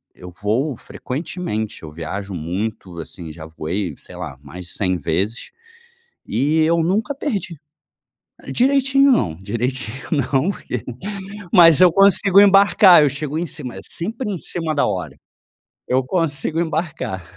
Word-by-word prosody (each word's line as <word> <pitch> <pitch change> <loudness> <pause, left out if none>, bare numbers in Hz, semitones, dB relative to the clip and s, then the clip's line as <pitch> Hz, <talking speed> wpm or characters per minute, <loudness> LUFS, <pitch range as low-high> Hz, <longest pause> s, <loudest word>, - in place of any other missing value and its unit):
eu 90 -1 -11
voo 125 +8 0
frequentemente, 125 - -5
eu 80 - -8
viajo 95 +6 -6
muito, 90 +2 -4
assim 85 0 -8
já 80 0 -10
voei, 85 +4 -4
sei - - -14
lá, 65 - -7
mais 85 +5 -10
de - - -9
100 95 -2 0
vezes 90 - -2 0.8
e 145 +8 +1
eu 165 +1 +2
nunca 205 - 0
perdi 215 - -3 1.0
direitinho 275 +1 +3
não, 85 - +1
direitinho 120 +4 -3
não, 140 +3 +1
porque 125 - -5 0.7
mas 165 -5 +7
eu 180 -2 +7
consigo 195 +1 +5
embarcar, 195 -3 +7
eu 145 - +4
chego 145 +2 -3
em 175 - -2
cima, 135 -6 -6
eh, - - -7
sempre 225 +7 -3
em 185 - -4
cima 165 -1 -2
da 145 - +2
hora - - -4 0.7
eu 130 +1 +2
consigo 160 0 -1
embarcar. 160 - -3
140 Hz, 140 wpm, -20 LUFS, -, 1.0 s, mas